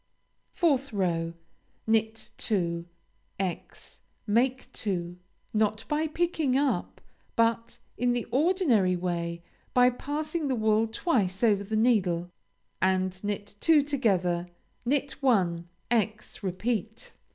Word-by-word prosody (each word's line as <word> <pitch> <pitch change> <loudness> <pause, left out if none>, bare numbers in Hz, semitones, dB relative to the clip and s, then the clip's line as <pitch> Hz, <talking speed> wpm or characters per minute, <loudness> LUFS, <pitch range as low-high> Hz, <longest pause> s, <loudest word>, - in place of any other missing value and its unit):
4th 280 -6 +2
row 170 -4 0 0.5
Knit 220 0 0
two; 170 -5 -1 0.5
× 185 -3 -5 0.3
make 245 +4 +1
two 175 -4 -3 0.3
(not 215 0 +1
by 305 +1 0
picking 315 -4 0
up, 280 -1 0 0.4
but 230 0 +1 0.2
in 245 0 +2
the 240 -1 -1
ordinary 270 - +3
way, 170 -1 -3 0.3
by 250 0 +6
passing 300 +4 -3
the 265 - +1
wool 220 0 +2
twice 220 - 0
over 205 -3 +4
the 215 +2 -3
needle), 185 -7 +2 0.5
and 185 0 +1
knit 205 0 -3
two 310 +1 +5
together; 185 -11 +1 0.4
knit 280 +2 +1
one; 180 -10 +2 0.2
× 220 -2 -1
repeat. 220 +3 -3
220 Hz, 110 wpm, -28 LUFS, 185-260 Hz, 0.5 s, by